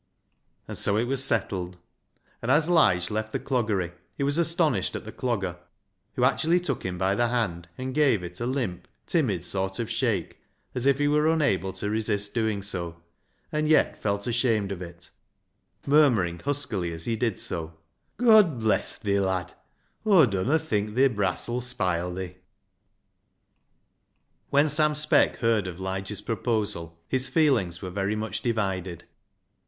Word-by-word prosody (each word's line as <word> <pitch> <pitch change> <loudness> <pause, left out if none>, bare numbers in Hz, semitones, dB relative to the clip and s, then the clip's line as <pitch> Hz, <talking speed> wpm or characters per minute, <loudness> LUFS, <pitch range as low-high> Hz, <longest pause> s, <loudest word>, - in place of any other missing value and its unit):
And - - -5
so 100 - +2
it 110 - +2
was 130 +2 +4
settled; 95 -7 0 0.6
and 115 - -4
as 150 +4 +4
Lige 90 - +3
left 110 +1 -3
the - - -2
Cloggery 110 -9 -1 0.3
he - - -1
was 145 +3 +1
astonished 165 -1 +1
at - - -5
the - - -7
Clogger, 100 -9 -2 0.6
who 125 - 0
actually 160 +7 +3
took 150 -8 -3
him 90 -1 -3
by 95 +2 +1
the 120 +4 +1
hand 95 -8 -2
and 130 0 -4
gave 135 -10 +3
it 90 0 -7
a 120 - -2
limp, 115 -10 -3 0.2
timid 115 - 0
sort 95 +1 -2
of 115 -1 -3
shake, 115 -7 -1 0.3
as 125 +1 -1
if 140 -1 +4
he 145 0 +1
were 150 +2 +3
unable 120 - +1
to 105 - -4
resist 105 -2 0
doing 110 -4 -1
so, 85 -4 -4 0.5
and 150 0 0
yet 155 0 +3
felt 100 -1 -1
ashamed 115 -4 0
of 95 -2 -5
it, 85 0 -9 0.7
murmuring 120 - +3
huskily, 130 -12 -2
as 80 0 -3
he 115 - 0
did 115 -2 -1
so 80 -1 -5
— - - -49
" - - -46
God 215 - +5
bless 110 -1 +1
thi, 100 -2 0
lad! 95 -2 -1 0.5
Aw 195 -8 +6
dunno 110 +8 +1
think 105 -9 -2
thi 135 +2 +5
brass 100 -6 -1
'uU 120 +1 -2
spile 90 -8 -1
thi." 95 -2 -6 2.1
When 145 +2 +4
Sam 150 0 +3
Speck 150 +1 +3
heard 115 -5 +2
of 90 -1 -7
Lige's 95 +2 -3
proposal 105 -7 -2
his 130 +5 +1
feelings 130 - +1
were 90 - -5
very 100 +2 -1
much 110 0 -3
divided. 95 -7 -2
110 Hz, 165 wpm, -26 LUFS, 95-135 Hz, 2.1 s, Aw